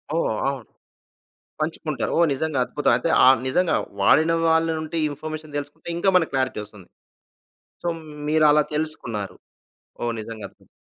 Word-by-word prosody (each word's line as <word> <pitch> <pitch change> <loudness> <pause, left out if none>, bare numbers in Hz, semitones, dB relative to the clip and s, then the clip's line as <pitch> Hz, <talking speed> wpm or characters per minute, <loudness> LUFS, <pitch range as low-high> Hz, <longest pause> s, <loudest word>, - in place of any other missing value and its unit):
ఓహ్! 165 - +1
అవును. 135 -4 -4 0.9
పంచుకుంటారు. 155 -3 -2
ఓహ్! 170 - +5
నిజంగా 145 0 -1
అద్భుతం. 145 - 0
అయితే, 125 - -1 0.2
ఆ! - - +8 0.2
నిజంగా 175 +6 +2 0.3
వాడిన 160 +11 +5
వాళ్ళ 160 0 +3
నుండి 155 +1 -4
ఇన్ఫర్మేషన్ 155 +1 -7
తెలుసుకుంటే, 145 +2 -8
ఇంకా 195 +3 +2
మనకి 170 -3 +3
క్లారిటీ 130 -4 0
వస్తుంది. 105 -3 -15 1.0
సో - - -5 0.4
మీరు 155 0 +3
అలా 150 +1 +5
తెలుసుకున్నారు. 120 -10 -4 0.7
ఓహ్! 120 0 0
నిజంగా 110 -1 -7
అద్భుతం. - - -26
150 Hz, 140 wpm, -23 LUFS, 130-160 Hz, 1.0 s, ఆ